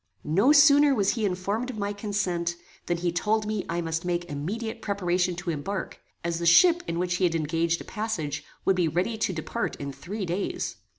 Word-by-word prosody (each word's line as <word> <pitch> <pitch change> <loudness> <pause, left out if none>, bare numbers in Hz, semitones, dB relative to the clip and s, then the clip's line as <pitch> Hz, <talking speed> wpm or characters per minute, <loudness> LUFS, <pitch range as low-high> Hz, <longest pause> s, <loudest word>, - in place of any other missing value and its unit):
No 195 - +4
sooner 290 -1 +7
was 200 -4 +2
he 225 -4 -1
informed 200 +6 -2
of 245 - -6
my 205 0 -2
consent, 190 -5 -1 0.3
than 175 - 0
he 175 0 -1
told 210 +5 0
me 210 -2 -3
I 170 +1 -1
must 165 0 -2
make 175 -1 -1
immediate 190 +10 -4
preparation 180 -3 0
to 175 0 -3
embark, 190 +6 -4 0.2
as 170 0 -1
the 170 - 0
ship 345 - +6
in 170 - -2
which 175 0 0
he 185 - -1
had 170 -2 +1
engaged 165 +2 0
a - - -9
passage 175 -10 -3 0.2
would 195 - +4
be 180 -2 +2
ready 180 +8 0
to 205 - +1
depart 160 -3 -3
in 140 -1 -6
three 190 +9 -5
days. 180 +3 -3
180 Hz, 200 wpm, -26 LUFS, 170-210 Hz, 0.3 s, sooner